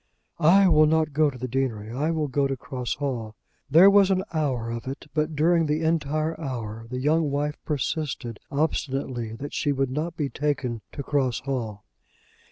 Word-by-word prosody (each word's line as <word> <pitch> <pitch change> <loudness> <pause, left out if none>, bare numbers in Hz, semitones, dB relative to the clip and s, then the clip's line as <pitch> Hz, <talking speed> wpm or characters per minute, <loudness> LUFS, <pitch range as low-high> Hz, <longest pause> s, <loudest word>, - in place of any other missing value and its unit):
"I 185 +5 +6
will 155 -3 +6
not 155 -1 +1
go 150 0 +3
to 130 - -9
the 130 +1 -4
deanery. 115 -4 -2
I 145 +6 -1
will 160 -2 0
go 140 +1 +1
to 135 -1 -3
Cross 125 -4 -4
Hall." 120 -6 -4 0.3
There 165 +7 +8
was 200 -1 +6
an 190 -1 +2
hour 130 -7 -1
of 115 +2 -5
it, 135 +2 -6
but 155 0 0
during 165 +2 +3
the 150 +2 0
entire 155 0 0
hour, 115 -5 -5
the 125 - -4
young 150 +3 +2
wife 145 +1 -2
persisted 140 -5 -3
obstinately 135 -5 -2
that 140 +5 -7
she 145 - 0
would 135 -2 0
not 160 +4 -3
be 145 - 0
taken 135 -6 -2
to 140 - -5
Cross 135 -4 0
Hall. 120 -7 -4
140 Hz, 180 wpm, -25 LUFS, 125-155 Hz, 0.3 s, There